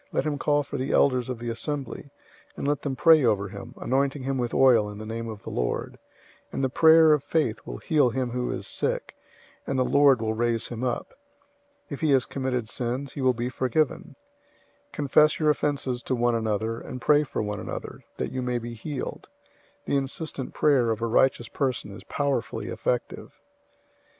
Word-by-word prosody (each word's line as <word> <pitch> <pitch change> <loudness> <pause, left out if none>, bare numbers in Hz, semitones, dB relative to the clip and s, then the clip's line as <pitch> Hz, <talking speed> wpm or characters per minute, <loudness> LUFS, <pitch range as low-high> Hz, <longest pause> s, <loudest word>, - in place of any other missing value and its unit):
Let - - 0
him 145 -2 -1
call 145 0 +2
for - - -6
the 130 +2 -2
elders 130 -3 +3
of 125 - -3
the 120 +1 -5
assembly, 140 +3 -4 0.5
and - - -3
let 145 0 0
them 140 -2 -3
pray 160 0 +6
over 100 -4 +1
him, 100 +1 -9
anointing 135 +1 0
him 135 0 -1
with 120 -1 -1
oil 120 -6 +4
in 105 - -8
the 110 - -7
name 115 +1 -5
of 105 -2 -8
the - - -7
Lord, - - -2 0.5
005:015 - - -35
and - - -2
the 130 - +2
prayer 160 +2 +6
of 150 -2 +1
faith 150 -9 0
will - - -5
heal 145 - +2
him 125 0 -2
who 125 0 -2
is - - -4
sick, - - -1 0.5
and 135 - -1
the 130 - +2
Lord 140 -2 +5
will 110 0 -1
raise 115 0 -1
him 120 0 -5
up. 125 -2 -2 0.7
If 140 - -7
he 160 - +2
has 130 -2 +3
committed 130 -4 -2
sins, 125 +4 -4
he 140 - -5
will 130 -1 +3
be 120 +2 -2
forgiven. 130 +3 -1 0.7
005:016 - - -42
Confess 150 +2 +3
your 155 -1 +4
offenses 140 -4 -1
to 130 - -1
one 120 0 +2
another, 110 0 -1
and 125 - -7
pray 150 +3 +4
for 135 - -3
one 105 -1 -3
another, - - -7
that - - -3
you 130 - -3
may 125 -1 -1
be 120 0 -6
healed. 130 +4 -6 0.6
The 140 - +1
insistent 135 0 -4
prayer 135 -6 +3
of 110 0 -1
a - - +2
righteous 120 +1 +2
person 130 -6 -2
is 100 - -10
powerfully 140 -6 -2
effective. 125 -1 -3
130 Hz, 200 wpm, -26 LUFS, 115-140 Hz, 0.7 s, pray